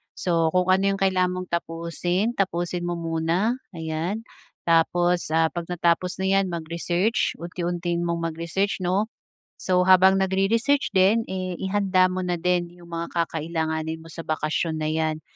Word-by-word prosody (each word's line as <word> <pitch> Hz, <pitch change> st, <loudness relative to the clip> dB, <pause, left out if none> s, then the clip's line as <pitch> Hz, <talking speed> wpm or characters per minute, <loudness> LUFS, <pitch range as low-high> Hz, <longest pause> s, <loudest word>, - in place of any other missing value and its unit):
So, 165 Hz, -2 st, +1 dB
kung 180 Hz, 0 st, +3 dB
ano 190 Hz, +1 st, +3 dB
'yong 195 Hz, -, -9 dB
kailangan 185 Hz, -1 st, +2 dB
mong -, -, -15 dB
tapusin, 170 Hz, +5 st, -1 dB
tapusin 175 Hz, -2 st, -1 dB
mo 175 Hz, -, -1 dB
muna, 170 Hz, +8 st, 0 dB, 0.2 s
ayan, 165 Hz, +7 st, -3 dB, 0.4 s
tapos, 175 Hz, +1 st, +2 dB
ah, 160 Hz, 0 st, +3 dB
'pagka-tapos 175 Hz, +1 st, 0 dB
na 195 Hz, +1 st, +3 dB
'yan, 195 Hz, -, +1 dB
mag-research 170 Hz, +5 st, -1 dB
unti-untiin 175 Hz, 0 st, -3 dB
mong 170 Hz, 0 st, -2 dB
mag-research, 170 Hz, +5 st, -2 dB
'no. 190 Hz, +5 st, 0 dB, 0.5 s
So, 180 Hz, -1 st, +3 dB
habang 190 Hz, +1 st, +6 dB
nagre-research 210 Hz, +10 st, +1 dB
din, 200 Hz, +5 st, +4 dB
eh, 185 Hz, -1 st, -3 dB
ihanda 190 Hz, -1 st, +2 dB
mo 185 Hz, -, -2 dB
na 180 Hz, -1 st, -1 dB
din 175 Hz, 0 st, +1 dB
'yong 175 Hz, -1 st, -16 dB
mga 170 Hz, 0 st, -3 dB
kakailanganin 160 Hz, -1 st, -2 dB
mo 165 Hz, -, -13 dB
sa -, -, -9 dB
bakasyon 155 Hz, +1 st, -1 dB
na 155 Hz, 0 st, -1 dB
'yan 155 Hz, -1 st, -1 dB
175 Hz, 150 wpm, -24 LUFS, 165-190 Hz, 0.5 s, habang